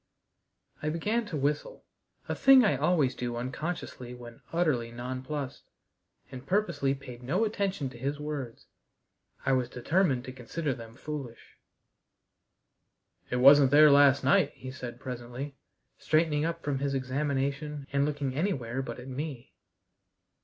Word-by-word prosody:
I 150 - -1
began 210 +8 -1
to 160 - -3
whistle 150 - -2 0.4
a - - -1
thing 270 -3 +7
I 200 - +3
always 145 -2 +2
do 120 -1 -4
unconsciously 125 0 -5
when 120 -1 -12
utterly 150 -9 +1
nonplused 130 +3 -5 0.7
and 130 -1 -8
purposely 160 -6 0
paid 125 -3 -10
no 175 - +1
attention 200 -8 -1
to 120 - -12
his 140 +3 -2
words. 145 -6 -5 0.8
I - - +3
was 130 -2 +1
determined 135 +1 +1
to 130 - -6
consider 135 +4 -3
them 115 -1 -10
foolish. 140 -4 -8 1.7
"It - - -1
wasn't 135 +2 +7
there 150 +2 +7
last 140 -1 +6
night," 140 +2 +3
he 130 0 -8
said 125 -2 -7
presently, 125 +3 -6 0.4
straightening 155 -1 +2
up 165 0 -3
from 140 -2 -1
his 140 0 -1
examination 140 +2 -2
and 140 0 +3
looking 145 -2 -1
anywhere 135 - -1
but 120 -2 -6
at 125 - -9
me. 135 -2 -6
140 Hz, 140 wpm, -29 LUFS, 125-150 Hz, 1.7 s, thing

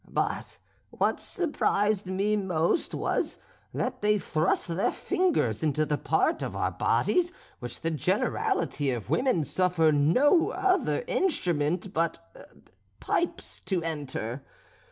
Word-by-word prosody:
But - - -2 0.3
what - - 0
surprised 210 - 0
me 195 +3 +1
most 180 - 0
was, - - -1 0.3
that - - -3
they 210 0 +3
thrust 160 -4 0
their 170 +3 +1
fingers 320 - 0
into 155 0 +1
the 150 0 -1
part 165 - +1
of - - -4
our - - 0
bodies 355 -1 +1 0.3
which 120 -1 -7
the 165 - -1
generality 145 -1 0
of 120 -1 -3
women 240 - +2
suffer 170 +1 +2
no 250 - +4
other 385 +5 +1
instrument 180 - 0
but 170 - -4 0.4
pipes 345 - -2
to 185 -4 -1
enter. 140 -5 -4
175 Hz, 120 wpm, -28 LUFS, 150-250 Hz, 0.4 s, no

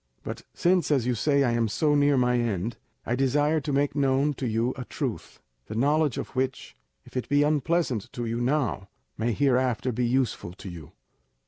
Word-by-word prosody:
But - - -6
since, 180 0 +2
as 135 -6 +2
you 125 - +1
say, 140 +4 +2
I 125 - +2
am 115 -1 +1
so 145 +8 +1
near 145 -1 +4
my 125 -1 +3
end, 110 -1 -2 0.3
I - - -1
desire 145 +4 +2
to 145 - -3
make 140 +1 +1
known 140 +1 +2
to 130 -2 -4
you 115 +3 0
a 130 - -5
truth, - - -5 0.3
the 110 - -6
knowledge 145 +3 +2
of - - -4
which, 130 0 -2 0.3
if - - -17
it 125 - -3
be 145 0 +4
unpleasant 150 - 0
to 120 - -4
you 115 +1 -2
now, 125 -7 0 0.3
may 115 +2 0
hereafter 130 -1 +1
be 120 +1 0
useful 125 -8 -1
to 95 +1 -9
you. 85 -4 -10
130 Hz, 195 wpm, -26 LUFS, 120-145 Hz, 0.3 s, near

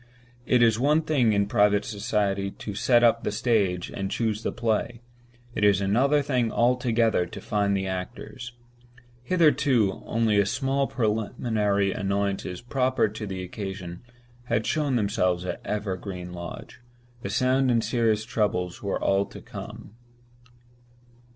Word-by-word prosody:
It 125 -2 +4
is 115 -1 +3
one 150 +5 +3
thing 140 -8 +2
in 100 -1 +2
private 105 0 +2
society 100 -1 -1
to 105 +1 -7
set 120 +4 +3
up 115 -1 +4
the - - -1
stage 105 -5 0
and 95 -1 -4
choose 110 -1 -1
the - - -2
play—it 120 +1 -4
is 100 -2 +5
another 130 +9 +2
thing 125 -5 0
altogether 120 -5 +2
to - - -9
find 100 -1 0
the 95 - -2
actors. 120 +6 -6 0.7
Hitherto, 140 - +2
only 110 -2 +2
the 100 - +2
small 135 +4 0
preliminary 105 -3 0
annoyances 100 -2 -2
proper 130 -2 +1
to 105 0 -6
the 95 -1 -5
occasion 90 -2 -6 0.4
had 110 -2 0
shown 150 -4 0
themselves 95 -5 0
at - - -4
Evergreen 95 -3 -4
Lodge. 85 -1 -8 0.4
The 100 - -4
sound 130 +5 +2
and 115 -2 +2
serious 110 -3 +1
troubles 105 -7 -1
were 100 -2 -2
all 100 +1 +1
to - - -11
come. - - -10
110 Hz, 140 wpm, -26 LUFS, 100-120 Hz, 0.7 s, is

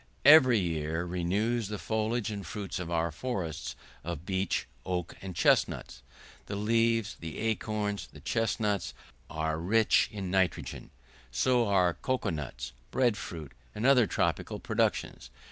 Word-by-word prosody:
Every 135 -5 +9
year 80 -2 -1
renews 100 +6 0
the 105 +1 -4
foliage 110 +1 -1
and 100 -1 -5
fruits 100 -1 -5
of 90 -2 -5
our 85 -1 0
forests 85 - -4 0.3
of 85 -1 -5
beech, 95 0 0 0.2
oak, 90 -1 -3
and 95 -2 -7
chesnuts; - - +2 0.5
the 100 - -4
leaves, 115 +1 +2
the 80 -2 -6
acorns, 110 -2 -1
the - - -13
chesnuts, 105 -3 -1 0.3
are 80 0 -2
rich 110 +6 +3
in 95 -3 -4
nitrogen; 95 -2 0 0.4
so 120 - +2
are 90 -3 +3
cocoa 130 0 -1
nuts, 70 -5 -5 0.2
bread 125 -4 +2
fruit, 80 -7 -7 0.2
and 105 - -2
other 130 -5 +6
tropical - - -1
productions. - - -1
100 Hz, 135 wpm, -30 LUFS, 85-115 Hz, 0.5 s, Every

